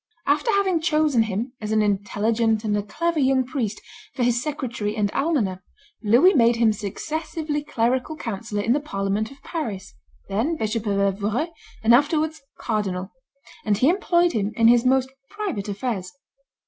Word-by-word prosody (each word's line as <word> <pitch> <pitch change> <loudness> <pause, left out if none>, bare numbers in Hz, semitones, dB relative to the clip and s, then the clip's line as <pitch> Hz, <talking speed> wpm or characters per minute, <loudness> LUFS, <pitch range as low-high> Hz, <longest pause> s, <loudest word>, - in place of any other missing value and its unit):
After 295 - +1
having 380 -4 +2
chosen 305 -6 +2
him, 225 +3 -2
as 215 0 -4
an 215 -1 +3
intelligent 215 +2 +1
and 210 -2 0
a 205 - +1
clever 315 +11 -1
young 260 -1 +3
priest, 240 -6 -3 0.4
for 250 - 0
his 240 0 +2
secretary 245 -8 -3
and 205 -2 0
almoner, 230 - 0 0.4
Louis 240 - +5
made 235 -4 +4
him 230 -2 +3
successively 300 - -4
clerical 255 +2 0
councillor 210 -5 -4
in 230 - +3
the 290 - +1
parliament 205 -5 -2
of 275 - -16
Paris, 215 - -5 0.3
then 225 +12 0
Bishop 220 -1 -2
of 200 -1 +1
Evreux, 205 - 0 0.3
and 225 +1 +5
afterwards 310 +4 +2 0.2
cardinal; 195 -4 -2 0.5
and 205 -2 +1
he 255 +7 +4
employed 350 -1 +2
him 215 -1 -1
in 230 0 +5
his 240 0 +5
most 260 0 +3 0.2
private 390 - -4
affairs. 200 -3 -3
235 Hz, 160 wpm, -23 LUFS, 210-295 Hz, 0.5 s, Louis